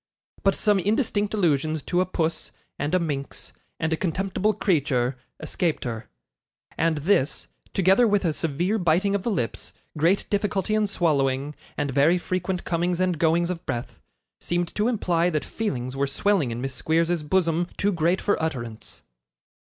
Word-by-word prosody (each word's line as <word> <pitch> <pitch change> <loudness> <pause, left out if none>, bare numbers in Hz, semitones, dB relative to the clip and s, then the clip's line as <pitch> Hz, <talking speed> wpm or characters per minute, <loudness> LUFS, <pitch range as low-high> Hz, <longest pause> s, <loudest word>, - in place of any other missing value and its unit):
But 195 -1 +3
some 210 -2 +2
indistinct 210 0 +1
allusions 155 -5 +1
to 180 0 +1
a 185 - 0
'puss,' 165 -3 -2 0.3
and 150 +5 0
a - - +4
'minx,' 145 -5 -4 0.3
and 160 0 0
a - - +3
'contemptible 190 +4 0
creature,' 140 - +1 0.2
escaped 170 -4 -1
her; 115 -3 -5 0.7
and 165 -1 +1
this, 150 -3 +1 0.3
together 195 +5 +5
with 205 -2 +2
a 160 - +2
severe 170 +8 0
biting 180 +3 +2
of 200 - +1
the 235 - -2
lips, 125 - -3 0.2
great 170 +6 +2
difficulty 205 -1 0
in 215 -1 +2
swallowing, 145 -6 +1 0.2
and 145 - -1
very 145 +6 +4
frequent 185 0 -2
comings 175 0 0
and 180 -3 +1
goings 170 +1 +2
of 170 -2 -5
breath, 120 0 -4 0.4
seemed 175 0 -1
to 210 +2 +1
imply 180 -7 +1
that 155 -3 -1
feelings 130 - -3
were 140 +1 0
swelling 185 -1 +1
in 115 +1 -4
Miss 135 0 -3
Squeers's 165 +5 +1
bosom 170 +1 +1
too 205 - +2
great 175 +1 +1
for 205 - +1
utterance. 120 -8 -5
170 Hz, 160 wpm, -25 LUFS, 150-190 Hz, 0.7 s, together